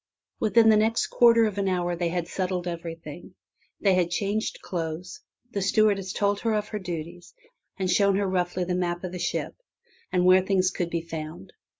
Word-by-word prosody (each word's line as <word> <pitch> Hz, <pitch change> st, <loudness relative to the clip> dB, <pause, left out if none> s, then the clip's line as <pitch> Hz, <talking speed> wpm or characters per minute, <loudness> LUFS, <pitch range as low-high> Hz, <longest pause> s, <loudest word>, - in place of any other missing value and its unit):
Within 225 Hz, +1 st, +4 dB
the 215 Hz, -, +6 dB
next 220 Hz, +2 st, +1 dB
quarter 230 Hz, -1 st, +6 dB
of 205 Hz, -2 st, -2 dB
an 195 Hz, -, 0 dB
hour 175 Hz, -2 st, 0 dB
they 170 Hz, 0 st, -1 dB
had 175 Hz, 0 st, -2 dB
settled 180 Hz, -1 st, -2 dB
everything. 170 Hz, +1 st, -7 dB, 0.4 s
They 195 Hz, -2 st, +3 dB
had 180 Hz, -2 st, +2 dB
changed 205 Hz, +4 st, -2 dB
clothes. 170 Hz, 0 st, -5 dB, 0.3 s
The 200 Hz, -, -2 dB
stewardess 200 Hz, -1 st, +2 dB
had -, -, -6 dB
told 205 Hz, 0 st, +1 dB
her 225 Hz, 0 st, 0 dB
of 210 Hz, 0 st, -2 dB
her 210 Hz, -, -4 dB
duties 175 Hz, -, -7 dB, 0.4 s
and 190 Hz, -, -1 dB
shown 200 Hz, +2 st, +3 dB
her 200 Hz, +1 st, +1 dB
roughly 180 Hz, -1 st, -1 dB
the 180 Hz, +1 st, -2 dB
map 175 Hz, -1 st, -2 dB
of 180 Hz, -, -4 dB
the 180 Hz, -, -6 dB
ship, 170 Hz, -, -2 dB, 0.6 s
and 180 Hz, -1 st, +2 dB
where 185 Hz, +1 st, +7 dB
things 190 Hz, -1 st, +1 dB
could 175 Hz, -2 st, -3 dB
be 170 Hz, -1 st, -2 dB
found. 155 Hz, -, -7 dB
185 Hz, 195 wpm, -26 LUFS, 175-200 Hz, 0.6 s, where